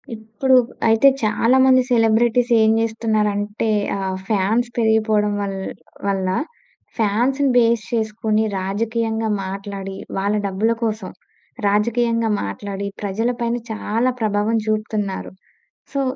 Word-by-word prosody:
ఇప్పుడు 225 +4 0 0.3
అయితే 225 +4 +5 0.2
చాలా 230 +4 +3
మంది 260 -1 +6
సెలబ్రిటీస్ 235 +1 +3
ఏం 220 0 +4
జేస్తున్నారంటే 215 -1 -1 0.3
ఆహ్, 190 -1 -3
ఫాన్స్ 220 +4 +1
పెరిగిపోవడం 220 -2 +2
వల్ 195 -1 -3 0.5
వల్ల 195 -1 0 0.7
ఫాన్స్‌ని 245 +6 +1
బేస్ 230 -2 +3
చేసుకొని 220 -1 0 0.2
రాజకీయంగా 225 +3 -1 0.2
మాట్లాడి, 195 0 -6 0.2
వాళ్ళ 200 +2 0
డబ్బుల 200 +4 0
కోసం, 215 -4 -2 0.6
రాజకీయంగా 230 +2 +1
మాట్లాడి 200 - -5
ప్రజలపైన 235 +4 -1
చాలా 225 +3 0
ప్రభావం 210 +1 +1
జూపుతున్నారు. 215 -2 -2 0.6
సో, 275 - -1
220 Hz, 100 wpm, -20 LUFS, 205-230 Hz, 0.7 s, మంది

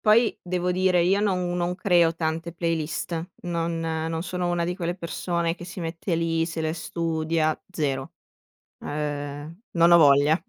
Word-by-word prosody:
Poi, 220 +1 +4
devo 180 0 -1
dire 180 -1 +3
io 195 +4 +3
non 180 -3 0
non 175 0 0
creo 175 -3 +3
tante 165 +1 -2
playlist, 165 +1 -2
non 170 -1 -2
non 160 0 -2
sono 180 0 -2
una 175 -1 0
di 180 +1 -2
quelle 175 -2 -2
persone 170 -1 -2
che 175 - -10
si 185 +1 -7
mette 165 +2 -2
lì, 165 0 +1
se 165 -1 -4
le 160 0 0
studia, 160 -1 -1
zero. 135 -6 -2 0.7
Ehm, 145 +3 -4
non 170 0 +4
ho 170 - +9
voglia. 145 0 +6
170 Hz, 160 wpm, -25 LUFS, 160-175 Hz, 0.7 s, ho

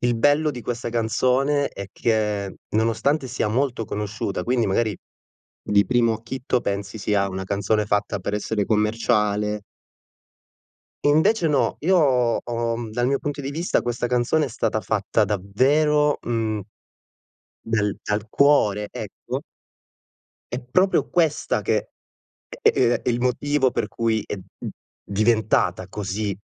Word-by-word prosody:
il 120 -1 +1
bello 145 +5 +3
di 125 -4 -7
questa 120 -1 -3
canzone 130 +5 +1
è 100 - -7
che, 105 -3 -1
nonostante 115 +6 +1
sia 110 -3 -1
molto 120 0 0
conosciuta 105 -2 -3
quindi, 120 -1 +1
magari, 105 +1 0 0.7
di 100 0 +3
primo 120 -2 +2
acchito 125 +2 -2
pensi 100 +1 -3
sia 100 -1 +1
una 95 0 -4
canzone 100 +2 0
fatta 105 0 0
per 100 +3 -4
essere 105 -1 -1
commerciale 105 -1 +1 1.5
invece 175 +4 +3
no, 150 -2 +1
io 185 +4 +3 0.5
ho, 115 -1 -2
mhmm, 115 -2 -5
dal 120 +2 0
mio 140 0 +1
punto 145 -1 -4
di 140 +1 -4
vista 165 +4 0
questa 120 0 -2
canzone 125 +6 +2
è - - -4
stata 110 -2 -1
fatta 105 +2 +1
davvero, 140 +10 +2
mhmm 110 -4 -1 1.0
del 105 -3 0
dal 105 +1 -2
cuore, 105 -9 +3
ecco - - -6 1.1
È 125 - -2
proprio 185 +10 +2
questa 160 -4 +1
che - - 0 0.7
è - - +6
ehm, 120 -1 +2
il 120 -1 +1
motivo 130 +2 +1
per - - -1
cui 110 -2 -1
è, - - -4
mhmm, 95 - -9 0.3
diventata 105 -4 +1
così 100 0 -3
115 Hz, 135 wpm, -23 LUFS, 105-130 Hz, 1.5 s, è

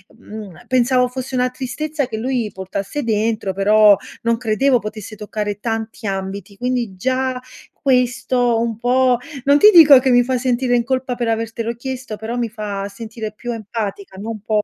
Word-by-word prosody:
mhmm, 210 -6 -10
pensavo 250 0 +3
fosse 260 0 -5
una 250 0 +2
tristezza 280 +3 -3
che - - -5
lui 240 -1 -1
portasse 195 +8 -4
dentro, 220 -2 0
però 210 +2 +6 0.3
non 230 0 +1
credevo 245 +3 +2
potesse 215 0 -7
toccare 210 -1 -4
tanti 225 -1 -4
ambiti, 195 +1 -4
quindi 245 -5 -2
già 260 +5 -1 0.4
questo 250 -2 +1
un 230 -2 -2
po' 250 +1 +3 0.3
non 285 +1 +4
ti 420 - +9
dico 295 -6 +9
che 260 0 +1
mi 245 0 +5
fa 255 0 0
sentire 245 0 +1
in 235 - 0
colpa 260 -1 -1
per 240 -1 -2
avertelo 225 +1 -2
chiesto, 255 -2 -6
però 225 +3 -5
mi 235 -1 0
fa 205 -2 -4
sentire 220 +1 -7
più 240 +3 -6
empatica, 205 -3 -5
non 215 +2 -5
po 210 0 0
230 Hz, 170 wpm, -19 LUFS, 215-255 Hz, 0.4 s, ti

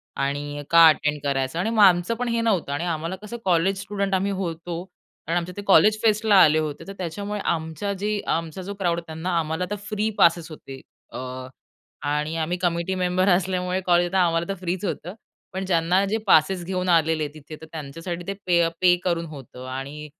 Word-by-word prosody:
आणि 145 +1 -3
का 165 -1 +8
अटेंड 150 -1 +2
करायचं? 135 +2 -1
आणि 185 - 0
मग 220 -2 +4
आमचं 180 +2 +4
पण 245 +2 -3
हे 230 0 0
नव्हतं 200 -10 0
आणि 145 +4 -2
आम्हाला 165 +1 -2
कसं 215 +3 -7
कॉलेज 185 +2 +2
स्टुडंट 200 -1 -2
आम्ही 195 +2 0
होतो. 170 -2 -4 0.4
कारण 165 +2 +1
आमचे 175 +1 -3
ते - - -3
कॉलेज 210 +2 +5
फेस्टला 215 -1 +3
आले 155 0 +4
होते, 155 +1 -4
तर 195 - -6
त्याच्यामुळे 200 +4 -4
आमच्या 160 +4 -2
जे, 205 +2 -2
आमचा 165 +2 -2
जो 195 +2 -6
क्राउड 175 -4 0
त्यांना, 170 +1 -3
आम्हाला 160 +3 -2
तर - - 0
फ्री 215 0 0
पासेस 170 -3 +4
होते. 135 -3 -10 0.3
अ, 120 - -7 0.9
आणि 150 +2 -1
आम्ही 165 +2 -1
कमिटी 175 +1 -1
मेंबर 185 +1 +1
असल्यामुळे 180 0 +1
कॉलेजला 175 +1 +3
आम्हाला 170 -1 +2
तर - - 0
फ्रीच 180 +2 -3
होतं. 180 -1 -4 0.4
पण 190 +1 -3
ज्यांना 180 +1 +2
जे 210 +3 0
पासेस 180 +1 +4
घेऊन 185 0 -2
आलेले 160 -2 +2
तिथे, 155 0 -10
तर - - -9
त्यांच्यासाठी 165 +3 -6
ते 195 - -1
पे 175 -1 +3
अ, 165 - +2
पे 180 -1 +6
करून 170 -2 0
होतं 135 -5 -10
आणि 135 +4 -6
175 Hz, 190 wpm, -24 LUFS, 160-190 Hz, 0.9 s, का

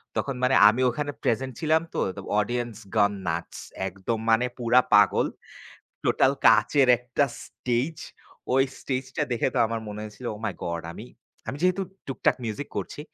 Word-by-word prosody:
তখন 140 -2 -1
মানে 130 +1 +4
আমি 115 +4 0
ওখানে 145 +4 -3
প্রেজেন্ট 130 +2 0
ছিলাম 160 0 +3
তো, - - -2 0.2
তো - - -5 0.2
অডিয়েন্স 120 +1 -2 0.2
গান 105 -1 +4 0.2
নাটস 85 +1 -3 0.3
একদম 95 +4 -3
মানে 115 +2 +4
পুরা 120 0 +4
পাগল। 105 -1 +5 0.8
টোটাল - - +3
কাচের 140 -3 +5
একটা 125 +4 0 0.2
স্টেজ। 125 +6 -2 0.6
ওই 135 - +5 0.2
স্টেজটা 130 -1 -3
দেখে 120 - +1
তো - - +1
আমার 115 0 -3
মনে 105 0 -6
হয়েছিল, 110 +3 -8
"ওহ - - -10
মাই - - -2
গড!" 85 -1 -3
আমি, - - -9 0.4
আমি 140 - -3
যেহেতু 185 +1 +2 0.2
টুকটাক 135 0 +1
মিউজিক 115 +5 -4
করছি, - - -4
120 Hz, 160 wpm, -26 LUFS, 110-135 Hz, 0.8 s, পাগল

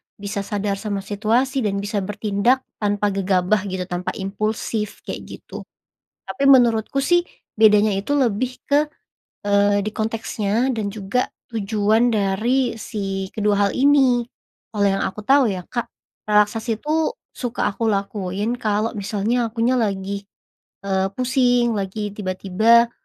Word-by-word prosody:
bisa 200 0 -5
sadar 200 0 -2
sama 200 -2 -3
situasi 230 +7 0
dan 210 -5 0
bisa 205 0 -1
bertindak 210 +5 0 0.2
tanpa 205 -1 0
gegabah 195 +1 +1
gitu 190 -1 -3
tanpa 180 0 -4
impulsif 210 +1 -3
kayak - - -6
gitu, - - -11 0.7
tapi 275 - -4
menurutku 240 -1 +4
sih 350 +4 +2 0.3
bedanya 210 -1 +6
itu 250 +9 -1
lebih 255 -1 0
ke, 290 +2 +2 0.6
eee, 205 0 +3
di 215 - -2
konteksnya 225 +2 -1
dan 215 -3 -2
juga 210 +4 -2 0.2
tujuan 215 +2 +2
dari 230 +4 +1
si 195 -4 -4
kedua 205 -1 +1
hal - - -3
ini, 265 -3 +4 0.5
kalau 205 -1 +1
yang 195 0 0
aku 210 +2 -5
tahu 270 +5 +4
ya 185 - -4
Kak 240 -1 -2 0.4
relaksasi 215 +2 +1
itu 315 +7 0 0.2
suka 245 -1 -3
aku 225 +3 -2
lakuin 200 +2 -2
kalau 215 0 0
misalnya 220 +3 -1
akunya 230 +3 +1
lagi, 200 -2 -2 0.6
eee, 190 -1 +1
pusing 245 -2 +2
lagi 205 +2 -4
tiba-tiba, 210 +4 +2
215 Hz, 135 wpm, -21 LUFS, 200-240 Hz, 0.7 s, bedanya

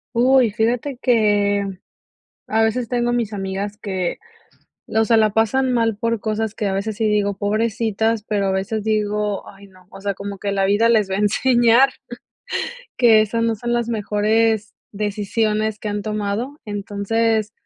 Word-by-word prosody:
Uy, 250 -2 +4
fíjate 240 +4 -1
que 205 -4 +2 0.8
a 220 +1 +1
veces 230 +1 0
tengo 240 -1 0
mis 230 -3 -1
amigas 200 +1 -4
que, 190 -4 -3 0.7
o 220 0 +2
sea, 225 +1 +3
la 215 -1 +3
pasan 250 +5 +1
mal 230 -3 +1
por 230 -1 -1
cosas 220 0 -2
que 210 - -2
a - - 0
veces 200 +2 -2
sí 220 - -1
digo: 205 -2 0
"Pobrecitas", 220 +1 0
pero 205 -2 -1
a - - +1
veces 205 +3 -2
digo: 210 -1 -1
"Ay 200 0 -15
no", 185 -1 -21
o - - -11
sea, 200 0 -2
como 200 +1 -7
que 200 +1 -3
la 195 -1 +1
vida 205 +4 +3
les 215 -4 +3
va 190 - 0
a - - -1
enseñar 240 +4 +4 1.1
que 230 -3 +6
esas 230 +2 0
no 230 -1 +1
son 240 +3 -3
las 235 -1 0
mejores 215 0 +1 0.2
decisiones 210 +1 -1
que - - -8
han 205 0 -3
tomado. 215 +6 -3
Entonces, 210 +1 -1
215 Hz, 165 wpm, -20 LUFS, 205-230 Hz, 1.1 s, que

